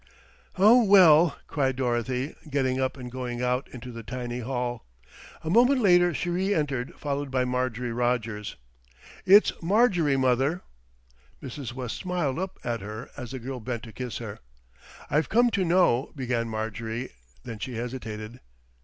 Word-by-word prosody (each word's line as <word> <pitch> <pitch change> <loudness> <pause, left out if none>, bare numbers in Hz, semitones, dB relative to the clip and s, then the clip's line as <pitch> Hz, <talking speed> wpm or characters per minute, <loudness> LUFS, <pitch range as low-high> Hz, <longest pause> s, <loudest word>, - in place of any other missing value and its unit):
"Oh, 225 +6 +7
well," 175 -6 +6
cried 135 -4 0
Dorothy, 125 +2 -1 0.2
getting 130 -2 0
up 130 +1 -1
and 125 -1 -8
going 125 -1 -4
out 125 +1 0
into 125 0 -9
the 115 -1 -8
tiny 120 +2 -5
hall. 125 -1 -3 0.6
A 160 - -3
moment 250 +6 +5
later 175 -5 +5
she 170 +4 -2
re 190 +3 0
entered, 135 -5 -2
followed 145 -1 -3
by 130 -1 +1
Marjorie 125 -1 -2
Rogers. 115 -3 -1 0.7
"It's 200 +3 +7
Marjorie, 175 - +3
mother." 135 +6 +1 0.8
Mrs. 130 -2 -7
West 125 -2 -5
smiled 175 -6 -2
up 190 0 -4
at 120 -1 -2
her 110 +4 -7
as 125 -4 -7
the 130 - -5
girl 130 +1 -6
bent 120 -1 -5
to 115 -3 -10
kiss 125 -2 -5
her. 110 -4 -7 0.7
"I've 150 +1 +1
come 240 +1 +4
to 195 - +1
know," 165 -7 +2
began 120 -4 -2
Marjorie, 110 +2 -4 0.3
then 115 -3 -7
she 125 +2 -5
hesitated. 115 -1 -6
130 Hz, 155 wpm, -26 LUFS, 120-160 Hz, 0.8 s, Oh